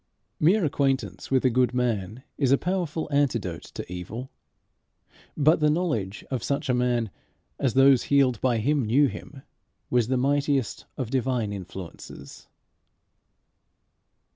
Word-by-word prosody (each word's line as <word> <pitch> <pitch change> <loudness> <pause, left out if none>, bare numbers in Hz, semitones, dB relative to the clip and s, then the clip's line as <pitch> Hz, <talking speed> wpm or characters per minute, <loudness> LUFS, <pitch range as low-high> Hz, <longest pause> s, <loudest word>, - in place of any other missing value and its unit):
Mere 180 +5 +4
acquaintance 140 -2 -1
with 130 -1 +2
a 130 - +4
good 125 0 +2
man 115 -2 -1
is 135 -3 +1
a 135 - +6
powerful 175 -3 -2
antidote 140 -2 0
to - - -7
evil; 110 +9 -7 1.1
but 155 +3 +4
the 150 -1 +3
knowledge 150 - -1
of 130 -4 -1
such 140 +3 -2
a - - +3
man, 120 -3 0 0.5
as 130 -3 0
those 135 -1 +5
healed 135 -5 +2
by 125 -3 +2
him 140 +5 +1
knew 125 +7 +4
him, 135 0 -7 0.5
was 120 -3 +2
the 130 +1 +1
mightiest 140 -1 0
of 125 -4 -4
divine 125 -5 0
influences. 95 -2 -9
130 Hz, 135 wpm, -26 LUFS, 120-145 Hz, 1.1 s, a